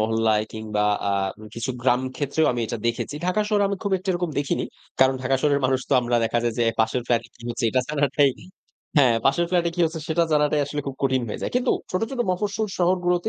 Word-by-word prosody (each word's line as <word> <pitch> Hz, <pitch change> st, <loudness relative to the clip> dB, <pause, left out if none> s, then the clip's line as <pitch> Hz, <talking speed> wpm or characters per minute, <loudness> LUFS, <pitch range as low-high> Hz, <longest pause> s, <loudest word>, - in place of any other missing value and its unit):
মহল্লায় 110 Hz, -1 st, +2 dB
কিংবা 110 Hz, -1 st, -2 dB, 0.3 s
আ -, -, +1 dB, 0.4 s
কিছু 115 Hz, +3 st, -3 dB
গ্রাম 125 Hz, -1 st, +3 dB, 0.2 s
ক্ষেত্রেও 145 Hz, +2 st, +1 dB
আমি 120 Hz, -, -2 dB
এটা 115 Hz, -, -4 dB
দেখেছি। 120 Hz, +5 st, -2 dB
ঢাকার 210 Hz, +4 st, +1 dB
শহরে 205 Hz, -2 st, +2 dB
আমি 200 Hz, -, -2 dB
খুব 200 Hz, -2 st, -2 dB
একটা 190 Hz, +2 st, -10 dB
এরকম 175 Hz, -1 st, -2 dB
দেখিনি। 140 Hz, -, -1 dB, 0.4 s
কারণ 130 Hz, 0 st, +5 dB
ঢাকা 130 Hz, +1 st, +2 dB
শহরের 145 Hz, -1 st, +2 dB
মানুষ 130 Hz, 0 st, +2 dB
তো -, -, -1 dB
আমরা 120 Hz, 0 st, 0 dB
দেখা 115 Hz, +1 st, +1 dB
যায় 120 Hz, -1 st, 0 dB
যে, 120 Hz, -, +3 dB, 0.2 s
পাশের 110 Hz, +3 st, +1 dB
ফ্ল্যাটে 115 Hz, -1 st, 0 dB
কি 120 Hz, -, -17 dB
হচ্ছে 120 Hz, +1 st, -3 dB
এটা 130 Hz, -, +2 dB
জানাটাই 145 Hz, -1 st, +2 dB, 0.7 s
হ্যাঁ, 130 Hz, -5 st, +6 dB
পাশের 170 Hz, +6 st, +3 dB
ফ্ল্যাটে 175 Hz, -2 st, +2 dB
কি 175 Hz, -, -2 dB
হচ্ছে 160 Hz, 0 st, -2 dB
সেটা 165 Hz, +1 st, +2 dB
জানাটাই 150 Hz, 0 st, +3 dB
আসলে 145 Hz, +1 st, -3 dB
খুব 135 Hz, -, -3 dB
কঠিন 130 Hz, -1 st, +2 dB
হয়ে -, -, -5 dB
যায়। -, -, -2 dB
কিন্তু 250 Hz, -, +1 dB, 0.2 s
ছোট, 185 Hz, -, -1 dB
ছোট 260 Hz, -2 st, -3 dB
মফস্বল 205 Hz, +4 st, -1 dB
শহরগুলোতে 180 Hz, +1 st, +1 dB
140 Hz, 215 wpm, -24 LUFS, 120-175 Hz, 0.7 s, হ্যাঁ